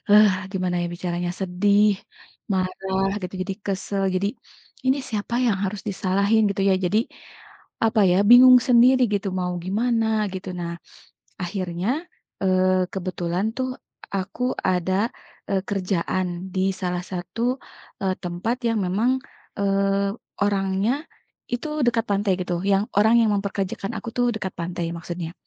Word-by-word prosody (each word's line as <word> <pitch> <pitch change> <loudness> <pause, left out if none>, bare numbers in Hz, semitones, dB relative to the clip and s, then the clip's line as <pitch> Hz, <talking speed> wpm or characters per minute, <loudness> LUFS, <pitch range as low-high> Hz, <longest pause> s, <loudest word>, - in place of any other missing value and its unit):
eee, 205 -2 +5
gimana 180 -2 -1
ya - - -1
bicaranya 175 0 -3
sedih, 200 +3 +3 0.6
marah 190 0 0
gitu 180 - -5
jadi 190 +1 -4
kesal, 195 0 -1
jadi, 190 +2 +1 0.6
ini 265 +2 +3
siapa 220 +2 -2
yang 245 -4 +3
harus 195 +1 -3
disalahin 200 +2 +2
gitu 200 0 -1
ya 190 - +5
jadi, 200 +4 +2 0.9
apa 220 -1 +3
ya 180 - +4
bingung 250 +1 +10
sendiri 250 0 +5
gitu 200 0 -1
mau 180 0 -1
gimana 220 +1 +1
gitu. 190 0 -6
Nah, 170 0 -3 0.7
akhirnya, 180 +1 -2 0.5
eee, 185 -1 +3
kebetulan 185 +2 -2
tuh 260 0 -1 0.4
aku 195 +5 -2 0.3
ada, 185 +4 +1 0.4
eee, 195 -1 +1
kerjaan 185 -1 -2
di 190 0 +1
salah 180 -1 -1
satu, 180 +4 -5 0.6
eee, 190 -1 +1
tempat 175 +7 -2
yang 230 -1 +1
memang, 210 +7 +1 0.5
eee, 195 0 +2 0.3
orangnya, 205 - 0 0.4
itu 245 +5 -2 0.2
dekat 230 -2 +2
pantai 200 -1 +2
gitu 180 -1 -2
yang 200 0 +3
orang 220 +2 +5
yang 225 -2 +3
mempekerjakan 195 +1 -3
aku 220 - -7
itu 245 - +1
dekat 190 -3 -4
pantai 170 0 -3
maksudnya. 170 0 -6
195 Hz, 135 wpm, -23 LUFS, 185-215 Hz, 0.9 s, bingung